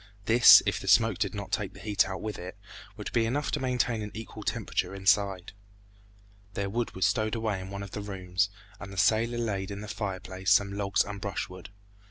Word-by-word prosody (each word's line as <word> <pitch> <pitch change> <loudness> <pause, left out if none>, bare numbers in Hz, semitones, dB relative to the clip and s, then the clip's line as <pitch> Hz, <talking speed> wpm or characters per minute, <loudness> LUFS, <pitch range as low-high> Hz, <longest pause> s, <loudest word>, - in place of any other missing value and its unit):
This, 120 +3 +8
if - - 0
the - - -9
smoke 115 -5 +4
did 100 -3 -1
not 100 -1 -6
take 100 -3 -2
the - - -11
heat 105 -2 +1
out 95 - -5
with 110 -1 -4
it, 90 +3 -8 0.4
would - - -6
be 115 -1 +2
enough 140 +5 -1
to 150 - -1
maintain 125 -3 0
an 105 - -5
equal 110 +1 -8
temperature - - -2
inside. 95 -1 +1 1.0
Their 100 -1 -2
wood 120 +2 -2
was 95 - +1
stowed 110 +3 +1
away 110 -4 -2
in 95 - -8
one 100 0 -6
of 100 - -9
the 105 - -5
rooms, 95 -1 -1 0.3
and 100 -1 -8
the 95 - -10
sailor 115 +4 +2
laid 100 -5 -2
in 100 0 -6
the 105 - -7
fireplace 95 -2 -4
some 100 0 +4
logs 100 -2 +1
and 100 -1 -7
brushwood. 95 -2 -5
100 Hz, 210 wpm, -28 LUFS, 95-110 Hz, 1.0 s, This